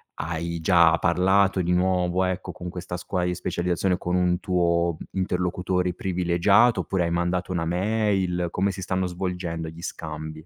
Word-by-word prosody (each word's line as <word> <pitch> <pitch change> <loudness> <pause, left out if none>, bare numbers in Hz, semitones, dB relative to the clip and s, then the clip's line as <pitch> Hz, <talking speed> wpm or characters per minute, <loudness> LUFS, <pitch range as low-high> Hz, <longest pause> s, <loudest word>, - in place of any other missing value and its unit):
hai 85 +1 -4
già 85 -2 +5
parlato 95 +2 +3
di 90 +1 0
nuovo, 90 0 +1
ecco, 90 0 -3
con 90 - -7
questa 90 0 -6
scuola 90 0 -2
di 90 0 -1
specializzazione, 90 +1 -1
con 90 0 -2
un 90 0 +2
tuo 85 -3 +1 0.2
interlocutore 90 0 -1
privilegiato, 90 +6 +3
oppure 95 -3 -1
hai 85 - -1
mandato 90 +1 -1
una 85 -2 -1
mail? 95 -1 0
Come 100 +2 0
si 95 - -7
stanno 90 0 -1
svolgendo 90 -2 -4
gli 80 +1 -9
scambi? 80 -1 -7
90 Hz, 155 wpm, -25 LUFS, 85-95 Hz, 0.2 s, già